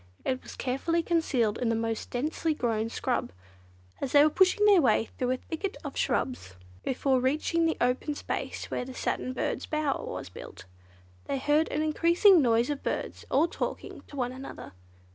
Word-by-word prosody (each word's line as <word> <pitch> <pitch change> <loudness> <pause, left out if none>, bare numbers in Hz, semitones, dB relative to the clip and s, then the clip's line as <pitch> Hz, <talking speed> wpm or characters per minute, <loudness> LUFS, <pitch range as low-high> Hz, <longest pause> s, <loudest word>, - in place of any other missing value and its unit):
It 255 0 -1
was - - -10
carefully 330 +7 -1
concealed 270 - +1
in 245 - 0
the 230 - +2
most 225 0 -2
densely 305 +5 -1
grown 225 -4 -1
scrub. 245 - -2 0.7
As 270 - -3
they 290 0 +8
were 305 - +4
pushing 375 +4 +4
their 400 -4 +7
way 225 -4 +2
through 250 - 0
a 255 - +1
thicket 380 - -5
of - - -6
shrubs, 170 - -1 0.3
before 260 0 +1
reaching 310 +5 +1
the 325 - -1
open 250 +4 0
space - - -4
where - - -1
the 255 +1 -9
Satin 255 - -2
Birds' 255 - -2
bower 305 -3 -1
was - - -5
built, - - -11 0.6
they 275 - -2
heard 295 +4 +2
an 305 - -1
increasing 340 +4 +5
noise 235 +1 +2
of 285 - -4
birds - - -4
all 300 +5 +3
talking - - -5
to - - -12
one 250 -2 -1
another. 265 +1 -9
275 Hz, 180 wpm, -28 LUFS, 250-320 Hz, 0.7 s, they